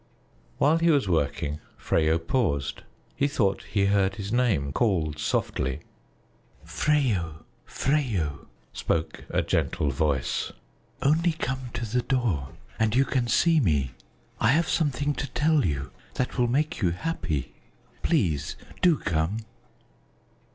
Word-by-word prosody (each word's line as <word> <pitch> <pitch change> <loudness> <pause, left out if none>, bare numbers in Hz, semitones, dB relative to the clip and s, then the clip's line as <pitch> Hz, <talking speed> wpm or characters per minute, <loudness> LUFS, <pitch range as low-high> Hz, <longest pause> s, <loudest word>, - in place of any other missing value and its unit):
While 155 +3 +4
he 170 +1 +3
was 145 -8 +3
working, 75 -3 0 0.2
Freyo 80 0 +2
paused; 80 - -1 0.3
he 140 - +2
thought 110 -9 +1
he 100 -2 +2
heard 100 -1 +2
his 100 +1 -5
name 100 - +1
called 80 - +1
softly. 65 -3 -1 0.8
"Freyo, 90 - 0 0.2
Freyo!" 105 - -1 0.3
spoke 80 -1 -2
a - - +1
gentle 70 - 0
voice. 70 -4 0 0.5
"Only 165 +4 +3
come 130 -5 -3
to 120 0 -2
the 120 +3 0
door, 110 - 0 0.3
and 110 0 +2
you 135 +2 +4
can 125 -3 0
see 165 +6 +4
me. 75 - +1 0.5
I 115 +3 +4
have 165 +3 +2
something 145 -2 +1
to 145 - -4
tell 155 -1 +3
you 70 -4 -3 0.2
that 125 - -1
will 125 -1 +2
make 145 +4 0
you 90 - +3
happy. 85 - -3 0.5
Please 75 -5 +1 0.3
do 175 -4 +5
come!" 80 +7 -1
105 Hz, 130 wpm, -26 LUFS, -, 0.8 s, do